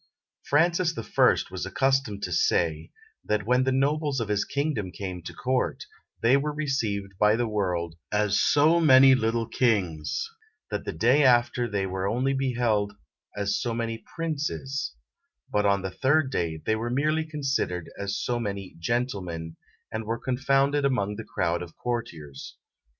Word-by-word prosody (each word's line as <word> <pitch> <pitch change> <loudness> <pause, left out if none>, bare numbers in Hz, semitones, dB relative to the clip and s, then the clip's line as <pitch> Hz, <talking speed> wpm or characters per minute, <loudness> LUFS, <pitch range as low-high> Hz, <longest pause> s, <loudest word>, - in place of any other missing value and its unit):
Francis 170 +3 +2
the 115 - -5
First 105 - +2
was - - -4
accustomed 135 -7 0
to - - -3
say, 80 -3 +1 0.3
that 105 -1 -1
when 125 +2 +3
the 130 - +2
nobles 140 +1 +1
of 110 -2 -3
his 105 -1 +1
kingdom 140 -9 -2
came 90 0 -6
to 85 - -7
court, 130 0 -1 0.4
they 120 +3 +5
were 145 +2 0
received 115 -10 -2
by 105 +1 +5
the 120 0 0
world 90 -6 -1 0.2
as 105 -1 +2
so 155 +3 +4
many 135 -4 +7
little 115 -2 +1
kings; 105 - 0 0.4
that - - -3
the - - -2
day 130 +6 +3
after 120 -1 +3
they 100 -2 -1
were 95 0 -2
only 125 +6 0
beheld 120 -6 0 0.4
as 100 0 0
so 115 -1 -2
many 115 -1 -3 0.2
princes; 145 - -3 0.6
but 105 0 +2
on 100 -1 +2
the 95 - -3
third 130 +8 +2
day 85 -8 -1
they 110 - +2
were 115 +2 -3
merely 155 +5 +1
considered 135 - -2
as 100 0 -2
so 120 -1 -1
many 100 -5 -5
gentlemen, 90 -7 -2 0.4
and 110 0 -4
were 115 +2 -2
confounded 135 +3 +1
among 105 -7 0
the 115 - -6
crowd 85 0 0
of 85 -2 -9
courtiers. 85 - -5
115 Hz, 160 wpm, -26 LUFS, 100-135 Hz, 0.6 s, many